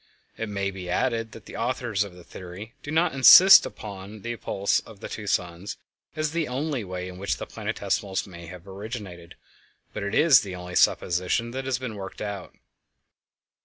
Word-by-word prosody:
It 115 - -4
may 100 -1 -2
be 95 -2 -8
added 115 +3 0
that 115 - -12
the - - -10
authors 120 -4 -1
of 100 -3 -10
the 90 - -13
theory 95 +7 -10
do - - -9
not 160 +2 +2
insist 180 +8 +9
upon 100 0 -9
the 120 0 -3
appulse 100 -3 0
of 110 -3 -14
two 105 +1 -7
suns 90 +1 -2 0.4
as 155 -1 -1
the 165 -1 -1
only 135 0 -2
way 90 -1 -5
in 90 0 -9
which 100 - -1
the - - -5
planetesimals 95 -1 -2
may 85 -3 -11
have 90 +2 -11
originated, 95 -4 -8 0.6
but - - -4
it 100 +2 -2
is 150 -6 +7
the 95 -3 -6
only 90 0 -8
supposition 90 +7 +2
that 130 +1 -5
has 130 -2 0
been 125 -3 -5
worked 95 -2 -8
out. 100 -3 -6
100 Hz, 180 wpm, -26 LUFS, 90-120 Hz, 0.6 s, insist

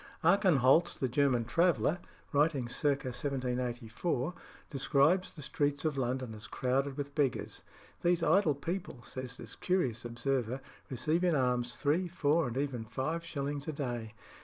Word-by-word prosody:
Archenholz, 175 - +4
the 130 - 0
German 125 -2 +2
traveller, 170 +4 +2 0.3
writing 145 -3 +2
circa 135 +1 0
1784, 125 +2 -2 0.3
describes 140 +6 +3
the 150 - -8
streets 145 +1 0
of 155 -2 +1
London 130 -2 -2
as 110 +1 -9
crowded 135 +3 0
with 140 0 -4
beggars. 140 -4 0 0.4
"These 175 -1 +2
idle 160 -2 +4
people," 165 -4 -4
says 130 -1 -6
this - - -8
curious 130 - 0
observer, 120 +1 -1 0.3
"receive 155 +7 0
in 175 -3 +3
alms 125 -2 +1
three, 160 +6 +1
four, 160 -2 +2
and 120 +1 -4
even 135 -5 -1
five 155 +9 -3
shillings 145 -2 -4
a 155 - -2
day. 120 -6 -4
140 Hz, 140 wpm, -32 LUFS, 125-155 Hz, 0.4 s, Archenholz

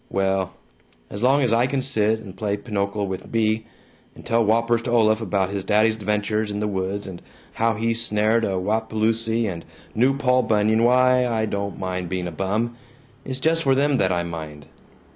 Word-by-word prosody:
Well 95 -1 0 0.6
As 100 - -6
long 135 +3 +3
as 120 -3 +2
I 120 +2 +3
can 135 -1 -1
sit 110 -4 +1
and 95 -4 -11
play 105 -1 -2
pinochle 100 -1 -2
with 95 -1 -6
Bea, 110 0 0 0.5
and - - -14
tell 115 0 +2
whoppers 115 +2 +2
to 120 - -5
Olaf 110 -2 +3
about 95 -2 -1
his 100 -1 -3
daddy's 110 +2 +3
adventures 105 0 -1
in 105 0 -3
the 105 - -1
woods, 95 0 -3
and 95 -3 -8 0.3
how 115 0 +1
he 115 +2 0
snared 115 0 +1
a 95 -3 0
wapaloosie 110 +3 0
and 85 -5 -4 0.3
knew 130 +5 +2
Paul 130 -2 +3
Bunyan, 110 0 +2
why, 125 +1 +4
I 110 -2 0
don't 100 -1 -4
mind 90 -2 -4
being 95 -1 -2
a 90 - -4
bum. 105 +7 -2 0.5
It's 130 0 -5
just 165 +3 +2
for 135 -3 +3
them 140 0 +2
that 95 -1 +2
I 85 -1 0
mind. 80 -4 -7
110 Hz, 190 wpm, -23 LUFS, 100-115 Hz, 0.6 s, why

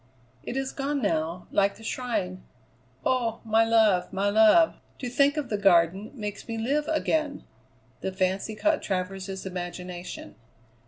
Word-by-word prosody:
"It 240 - -5
is 270 0 -2
gone 280 +1 -2
now, 165 -3 -1
like 200 0 +2
the 225 - -14
shrine. 225 - -3 0.6
Oh! 235 -3 +1
my 220 0 +4
love, 220 -5 +3
my 200 +1 0
love, 220 +10 +5 0.2
to 255 - -5
think 280 +4 +3
of 295 - -2
the 210 - -1
Garden 190 +1 +3
makes 210 -4 -6
me 230 -1 -4
live 285 +7 0
again." 310 -2 0 0.6
The 190 - -3
fancy 190 +3 -1
caught 310 +7 +1
Travers's 190 0 -3
imagination. 180 - -6
215 Hz, 145 wpm, -27 LUFS, 185-260 Hz, 0.6 s, love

